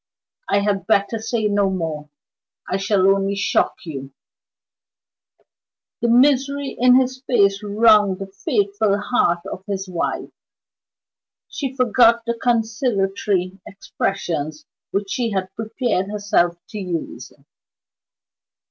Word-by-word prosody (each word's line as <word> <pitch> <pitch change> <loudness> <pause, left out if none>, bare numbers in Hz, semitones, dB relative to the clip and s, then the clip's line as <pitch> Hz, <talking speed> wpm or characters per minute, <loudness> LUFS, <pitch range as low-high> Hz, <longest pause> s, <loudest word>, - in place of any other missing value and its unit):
"I 200 - +3
had 200 -1 -1
better 220 +1 +1
say 225 0 -2
no 205 -1 +2
more, 160 -5 -4 0.6
I 190 - -1
shall 195 -1 +1
only 195 0 +2
shock 200 - +1
you." 135 -4 -7 1.9
The 235 - +1
misery 275 +3 +3
in 250 +1 +5
his 260 0 -2
face 200 -6 +2
wrung 210 -1 +4
the 195 - -5
faithful 205 - 0
heart 205 -6 +1
of 190 -1 -7
his 195 -1 -3
wife. 180 -2 -3 1.2
She 270 -3 -4
forgot 235 -2 +4
the 235 - 0
conciliatory 210 -5 -1
expressions 160 -6 -4 0.2
which 195 0 -3
she 235 +2 -1
had 190 -1 -3
prepared 220 -3 -2
herself 200 -5 +1
to 215 - -6
use. 180 -4 -5
205 Hz, 110 wpm, -21 LUFS, 190-230 Hz, 1.9 s, in